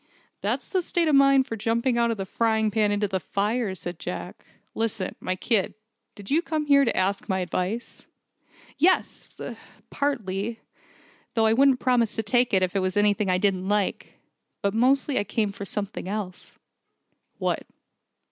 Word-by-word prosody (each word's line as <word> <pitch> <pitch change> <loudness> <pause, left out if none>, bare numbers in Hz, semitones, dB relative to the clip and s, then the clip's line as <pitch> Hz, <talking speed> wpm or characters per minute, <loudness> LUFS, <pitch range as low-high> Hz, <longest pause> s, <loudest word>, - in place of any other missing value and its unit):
"That's - - -2
the 375 - 0
state 340 -1 0
of 305 - +2
mind 275 -1 +5
for 225 - -5
jumping 230 +3 0
out 235 0 +2
of 230 - -1
the 195 - -3
frying 220 +1 +1
pan 210 -1 +2
into 205 0 +1
the 190 -1 -1
fire," 205 - -1
said 175 -2 -7
Jack. - - -6 0.3
"Listen, 225 -4 -2
my 185 - -2
kid, 200 0 +1 0.4
did 205 +1 -10
you 315 +4 +4
come 315 -3 -2
here 280 -1 +5
to - - 0
me - - +2
to - - -5
ask 195 +3 0
my 190 - +1
advice?" 185 +5 -3 0.7
"Yes, 370 +2 +2 0.6
partly. 225 -6 -2 0.8
Though 225 -1 +3
I 220 - +4
wouldn't 265 +1 +4
promise 245 -4 +2
to 225 - -1
take 245 +3 +2
it 190 -1 +3
if 185 +1 -1
it - - +3
was 185 +1 -1
anything 205 -1 +2
I 180 - +3
didn't 190 -1 0
like. 205 -2 -1 0.5
But 200 0 +1
mostly 260 +4 +2
I - - 0
came 210 0 -1
for 200 0 -7
something 200 -1 -4
else." 200 -3 -6 0.8
"What?" - - -2
215 Hz, 175 wpm, -25 LUFS, 195-245 Hz, 0.8 s, mind